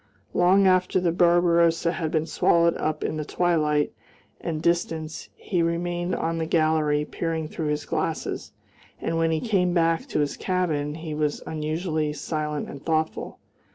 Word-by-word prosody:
Long 190 Hz, +3 st, +4 dB
after 185 Hz, 0 st, +3 dB
the 175 Hz, -2 st, +1 dB
Barbarosa 170 Hz, -1 st, +3 dB
had 165 Hz, -3 st, -2 dB
been 155 Hz, 0 st, 0 dB
swallowed 170 Hz, +1 st, +3 dB
up 155 Hz, 0 st, -2 dB
in 155 Hz, -, -2 dB
the 155 Hz, -, -2 dB
twilight 150 Hz, -3 st, +1 dB, 0.5 s
and 160 Hz, -2 st, -3 dB
distance 160 Hz, -2 st, -1 dB
he 180 Hz, -4 st, -1 dB
remained 175 Hz, +1 st, -1 dB
on 165 Hz, 0 st, -1 dB
the 160 Hz, -, -1 dB
gallery 155 Hz, -2 st, +2 dB
peering 165 Hz, -1 st, -3 dB
through 160 Hz, 0 st, -4 dB
his 150 Hz, 0 st, -1 dB
glasses, -, -, -3 dB, 0.5 s
and 165 Hz, -, -1 dB
when 165 Hz, 0 st, +2 dB
he 160 Hz, -1 st, +1 dB
came 185 Hz, -5 st, +1 dB
back 165 Hz, -1 st, +2 dB
to -, -, -1 dB
his 145 Hz, -, -1 dB
cabin 155 Hz, -6 st, -1 dB
he 160 Hz, -1 st, -6 dB
was 150 Hz, -1 st, -1 dB
unusually 155 Hz, 0 st, -2 dB
silent 150 Hz, 0 st, -3 dB
and 140 Hz, -, -9 dB
thoughtful. 160 Hz, -1 st, -1 dB
165 Hz, 155 wpm, -25 LUFS, 155-175 Hz, 0.5 s, Long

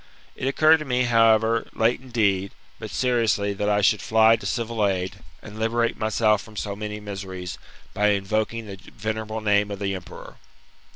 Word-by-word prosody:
It 130 Hz, -, -3 dB
occurred 155 Hz, +4 st, +5 dB
to 155 Hz, -, -6 dB
me, 125 Hz, -2 st, +1 dB
however, 115 Hz, -1 st, +3 dB
late 115 Hz, +3 st, +1 dB
indeed, 100 Hz, -7 st, 0 dB, 0.3 s
but -, -, -7 dB
seriously, 115 Hz, -5 st, +1 dB
that 105 Hz, +1 st, -1 dB
I 105 Hz, 0 st, +2 dB
should 105 Hz, +1 st, +3 dB
fly 110 Hz, 0 st, +5 dB
to -, -, -6 dB
civil 115 Hz, -2 st, -2 dB
aid, 95 Hz, 0 st, -2 dB, 0.3 s
and 110 Hz, 0 st, -10 dB
liberate 115 Hz, +1 st, 0 dB
myself 110 Hz, -1 st, +1 dB
from 110 Hz, 0 st, -14 dB
so 100 Hz, -1 st, -4 dB
many 105 Hz, 0 st, -5 dB
miseries, 95 Hz, -3 st, -7 dB, 0.3 s
by 105 Hz, +1 st, +2 dB
invoking 110 Hz, +3 st, -1 dB
the 100 Hz, -2 st, -8 dB, 0.2 s
venerable 110 Hz, 0 st, -4 dB
name 105 Hz, -1 st, +2 dB
of 100 Hz, -, -5 dB
the 100 Hz, 0 st, -2 dB
emperor. 95 Hz, -2 st, -9 dB
110 Hz, 170 wpm, -24 LUFS, 100-115 Hz, 0.3 s, occurred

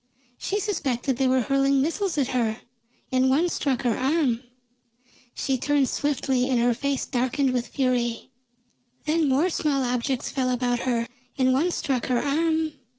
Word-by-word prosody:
She 410 Hz, -, -1 dB
suspected 275 Hz, -, -1 dB
they 265 Hz, 0 st, +2 dB
were 255 Hz, 0 st, +3 dB
hurling 275 Hz, +2 st, +2 dB
missiles 335 Hz, +5 st, -1 dB
at 270 Hz, -3 st, +1 dB
her, 230 Hz, -3 st, -1 dB, 0.5 s
and 260 Hz, 0 st, +3 dB
one 315 Hz, +7 st, +3 dB
struck 270 Hz, -6 st, -1 dB
her 240 Hz, -3 st, +1 dB
arm. 265 Hz, -4 st, +1 dB, 0.9 s
She 265 Hz, -3 st, -1 dB
turned 285 Hz, 0 st, +2 dB
swiftly 265 Hz, -3 st, 0 dB
and 250 Hz, -2 st, +2 dB
her 240 Hz, +1 st, +3 dB
face 280 Hz, +3 st, -2 dB
darkened 260 Hz, +1 st, 0 dB
with 245 Hz, -1 st, -1 dB
fury. 250 Hz, -3 st, -1 dB, 0.7 s
Then 310 Hz, -1 st, +2 dB
more 295 Hz, +8 st, +2 dB
small 285 Hz, -4 st, 0 dB
objects 250 Hz, +1 st, -1 dB
fell 260 Hz, -2 st, 0 dB
about 245 Hz, -1 st, 0 dB
her, 235 Hz, -1 st, 0 dB, 0.3 s
and 260 Hz, -1 st, +3 dB
one 305 Hz, +7 st, +2 dB
struck 265 Hz, -7 st, -1 dB
her 250 Hz, -2 st, +1 dB
arm. 315 Hz, +2 st, 0 dB
265 Hz, 155 wpm, -25 LUFS, 250-290 Hz, 0.9 s, were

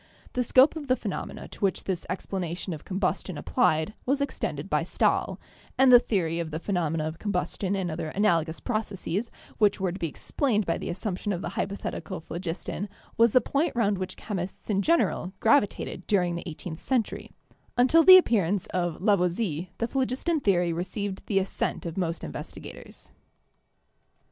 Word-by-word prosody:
The 250 Hz, -, +1 dB
scope 260 Hz, +6 st, +5 dB
of 300 Hz, -3 st, -6 dB
the 255 Hz, -, +4 dB
phenomena 210 Hz, -6 st, -5 dB
to -, -, -13 dB
which 195 Hz, -2 st, 0 dB
this 185 Hz, -3 st, -3 dB
explanation 180 Hz, -1 st, -3 dB
of 155 Hz, -, -8 dB
combustion 185 Hz, -2 st, -2 dB
applied 155 Hz, +5 st, +1 dB
was 275 Hz, +2 st, +1 dB
extended 280 Hz, -, -3 dB
by -, -, +1 dB
Stahl, -, -, 0 dB, 0.4 s
and 265 Hz, -1 st, +6 dB
the 245 Hz, -, +10 dB
theory 170 Hz, -8 st, -1 dB
of 165 Hz, -2 st, -3 dB
the 155 Hz, -, -4 dB
phe 170 Hz, -, -9 dB
nomena 165 Hz, -4 st, 0 dB
of 160 Hz, +1 st, -6 dB
combustion 200 Hz, -1 st, -1 dB
and 185 Hz, -3 st, -2 dB
other 155 Hz, -, -3 dB
analogous 170 Hz, -4 st, +1 dB
processes 215 Hz, -2 st, -2 dB, 0.3 s
which 210 Hz, -2 st, +3 dB
were 190 Hz, -2 st, 0 dB
to 185 Hz, -, -7 dB
be 170 Hz, -, -1 dB
explained 215 Hz, -, -1 dB
by 165 Hz, -, -1 dB
the -, -, -5 dB
assumption 195 Hz, +2 st, -3 dB
of 180 Hz, -2 st, -3 dB
the -, -, -2 dB
hypo 195 Hz, +1 st, -2 dB
thetical 185 Hz, -3 st, -5 dB
phlogiston 180 Hz, +4 st, -4 dB, 0.3 s
was 230 Hz, 0 st, +5 dB
the 255 Hz, -, +5 dB
point 285 Hz, +6 st, 0 dB
round 205 Hz, -5 st, +1 dB
which 185 Hz, -, -5 dB
chemists 195 Hz, 0 st, -5 dB
in 195 Hz, -1 st, +2 dB
general 310 Hz, -, +1 dB
gravitated 205 Hz, -8 st, +1 dB
during 180 Hz, -4 st, +2 dB
the 170 Hz, 0 st, -5 dB
eighteenth 160 Hz, +1 st, -7 dB
century; 250 Hz, -5 st, -1 dB, 0.5 s
until 260 Hz, +7 st, +6 dB
the 370 Hz, +1 st, +11 dB
appearance 205 Hz, -, +2 dB
of 175 Hz, -1 st, -1 dB
Lavoisier 180 Hz, -3 st, +1 dB
the 230 Hz, -, -1 dB
phlogiston 270 Hz, +6 st, 0 dB
theory 180 Hz, -8 st, +2 dB
received 190 Hz, +3 st, -4 dB
the 200 Hz, -, +1 dB
assent 195 Hz, -1 st, -1 dB
of 165 Hz, -1 st, -4 dB
most 170 Hz, -3 st, -2 dB
investigators. 75 Hz, -, -9 dB
195 Hz, 170 wpm, -27 LUFS, 175-225 Hz, 0.5 s, the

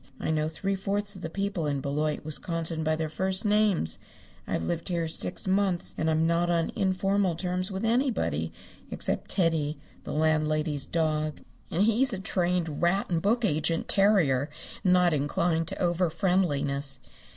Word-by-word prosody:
I -, -, -1 dB
know 155 Hz, 0 st, 0 dB
three 195 Hz, +5 st, -2 dB
fourths 200 Hz, +1 st, -1 dB
of 190 Hz, -, -10 dB
the 165 Hz, -, -4 dB
people 195 Hz, -3 st, -2 dB
in 140 Hz, -1 st, -1 dB
Beloit, 150 Hz, +2 st, -2 dB
Wisconsin, 165 Hz, +1 st, -2 dB
by 155 Hz, 0 st, +1 dB
their 160 Hz, 0 st, -2 dB
first 190 Hz, +6 st, 0 dB
names. 210 Hz, -, +2 dB, 0.5 s
I've -, -, -1 dB
lived 170 Hz, +1 st, -3 dB
here 170 Hz, -2 st, 0 dB
six 160 Hz, +2 st, -1 dB
months 190 Hz, -2 st, +1 dB
and 160 Hz, -, 0 dB
I'm 160 Hz, 0 st, +2 dB
not 170 Hz, +1 st, +2 dB
on 170 Hz, -1 st, +1 dB
informal 195 Hz, -1 st, +1 dB
terms 180 Hz, +2 st, -1 dB
with 190 Hz, +3 st, -3 dB
anybody 225 Hz, -, 0 dB, 0.4 s
except -, -, -2 dB
Teddy, 160 Hz, -4 st, +1 dB, 0.3 s
the -, -, -6 dB
landlady's 155 Hz, -1 st, +1 dB
dog, 155 Hz, -2 st, -1 dB, 0.3 s
and 180 Hz, +5 st, +1 dB
he's 230 Hz, +4 st, +3 dB
a -, -, -2 dB
trained 175 Hz, -5 st, -1 dB
rat 180 Hz, +3 st, +1 dB
and 165 Hz, -1 st, +1 dB
book 225 Hz, +5 st, +2 dB
agent 160 Hz, -1 st, 0 dB
terrier, 165 Hz, -9 st, +3 dB, 0.3 s
and 185 Hz, -, +3 dB
not 180 Hz, -2 st, +4 dB
inclined 160 Hz, +3 st, 0 dB
to -, -, -4 dB
overfriendliness. 170 Hz, -6 st, +1 dB
170 Hz, 160 wpm, -28 LUFS, 155-190 Hz, 0.5 s, not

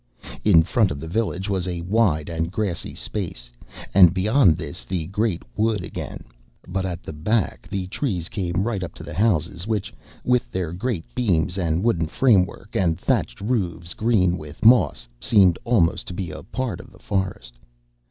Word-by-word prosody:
In 85 Hz, -6 st, +6 dB
front 105 Hz, +4 st, +2 dB
of 70 Hz, -, -4 dB
the 80 Hz, -, -7 dB
village 95 Hz, 0 st, -1 dB
was 95 Hz, -3 st, -1 dB
a 85 Hz, -2 st, -3 dB
wide 90 Hz, -5 st, +1 dB
and 85 Hz, 0 st, -2 dB
grassy 100 Hz, -3 st, -3 dB
space, 70 Hz, -, -4 dB, 0.4 s
and 90 Hz, -2 st, +7 dB
beyond 95 Hz, -, +4 dB
this 85 Hz, 0 st, -6 dB
the 90 Hz, -4 st, -3 dB
great 100 Hz, 0 st, -1 dB
wood 110 Hz, -3 st, +1 dB
again, -, -, -6 dB, 0.4 s
but 95 Hz, +1 st, -2 dB
at 90 Hz, -1 st, -5 dB
the -, -, -7 dB
back 105 Hz, +8 st, -1 dB
the 95 Hz, -2 st, -3 dB
trees 95 Hz, -, -2 dB
came 90 Hz, -1 st, -2 dB
right 110 Hz, -4 st, -2 dB
up 90 Hz, -, -6 dB
to -, -, -10 dB
the -, -, -8 dB
houses, 90 Hz, -3 st, 0 dB
which, 110 Hz, -3 st, -2 dB, 0.3 s
with 125 Hz, 0 st, +2 dB
their 90 Hz, -3 st, -2 dB
great 95 Hz, -2 st, -2 dB
beams 90 Hz, -8 st, +1 dB
and 85 Hz, -1 st, 0 dB
wooden 85 Hz, -9 st, +1 dB
framework 100 Hz, -1 st, +2 dB
and 85 Hz, -4 st, +1 dB
thatched -, -, 0 dB
roofs, 90 Hz, -7 st, -2 dB
green 95 Hz, -6 st, +2 dB
with 75 Hz, +6 st, -8 dB
moss, 85 Hz, -, +5 dB
seemed 95 Hz, -6 st, +4 dB
almost 105 Hz, -9 st, +2 dB
to 90 Hz, -, -6 dB
be 90 Hz, -3 st, -4 dB
a -, -, -8 dB
part 130 Hz, -3 st, -4 dB
of -, -, -12 dB
the -, -, -17 dB
forest. 95 Hz, -12 st, -3 dB
95 Hz, 175 wpm, -23 LUFS, 85-105 Hz, 0.4 s, and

